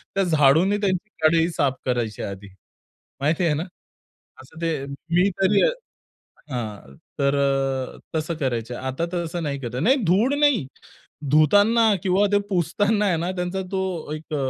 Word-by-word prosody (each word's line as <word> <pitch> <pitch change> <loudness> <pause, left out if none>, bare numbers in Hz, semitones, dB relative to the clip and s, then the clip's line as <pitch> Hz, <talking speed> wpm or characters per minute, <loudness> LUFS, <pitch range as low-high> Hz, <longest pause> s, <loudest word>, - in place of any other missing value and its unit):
त्या 195 - +2
झाडूने 165 +4 +4
त्यांची 195 +1 -1 0.2
कढई 165 +1 +4
साफ 135 -2 +1
करायचे 120 -4 -2
आधी, 100 0 -7 0.7
माहिती 160 +5 +1
आहे 155 - +2
ना? 160 - -2 0.8
असं 160 +5 -15
ते 155 -5 -1
मी 170 +7 0
तरी 195 +1 +4 0.9
हां. 105 - -6 0.3
तर 140 0 +2 0.6
अ, - - -15 0.2
तसं 160 +2 -1
करायचे. 120 -5 -2
आता 130 +6 -3
तसं 170 -1 -3
नाही 140 -2 -3
करत 120 -2 -6
नाही 265 +5 +5
धूळ 210 +11 +3
नाही. 285 - +3 0.7
धुताना 205 +9 +5
किंवा 195 +2 +3
ते 205 - +5
पुसताना 205 +4 +1
आहे 175 -4 +2
ना, 175 +3 -2
त्यांचा 180 +2 -2
तो 190 -5 -3
एक 155 0 -6
165 Hz, 145 wpm, -23 LUFS, 140-190 Hz, 0.9 s, नाही